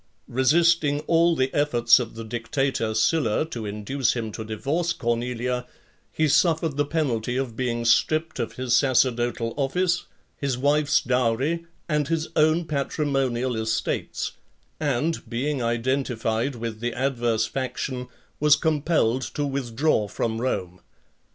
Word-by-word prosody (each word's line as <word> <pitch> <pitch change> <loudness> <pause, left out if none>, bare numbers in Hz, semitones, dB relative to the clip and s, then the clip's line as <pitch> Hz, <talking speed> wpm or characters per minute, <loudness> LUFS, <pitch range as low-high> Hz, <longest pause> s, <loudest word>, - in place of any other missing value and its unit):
Resisting 150 +3 +3
all 170 +1 +3
the 130 -2 0
efforts 120 -5 +4
of 115 -3 -5
the 115 - -6
dictator 115 0 -1
Sylla 120 +2 +2
to 115 -6 -4
induce 105 +6 -1
him 115 -3 -3
to 110 - -6
divorce 145 +11 -1
Cornelia, 125 +1 -2 0.4
he 155 - +1
suffered 160 0 +2
the 145 0 0
penalty 125 -7 -1
of 130 -4 -3
being 120 -1 -2
stripped 155 +7 +2
of 115 - -2
his 125 -2 0
sacerdotal 120 -3 +2
office, 175 +6 0 0.3
his 135 -3 -2
wife's 145 +2 +3
dowry, 130 +7 0 0.2
and 150 -3 0
his 160 0 -1
own 155 +2 +3
patrimonial 135 -4 -1
estates; 110 0 -2 0.5
and, 150 -1 -1
being 130 +4 -1
identified 120 0 -1
with 115 -2 -5
the 120 +1 -2
adverse 120 -4 0
faction, 130 0 -4 0.3
was 150 0 +6
compelled 150 -6 +1
to 145 +3 -3
withdraw 135 -3 0
from 110 +2 -2
Rome. 90 -8 -2
130 Hz, 130 wpm, -25 LUFS, 115-150 Hz, 0.5 s, was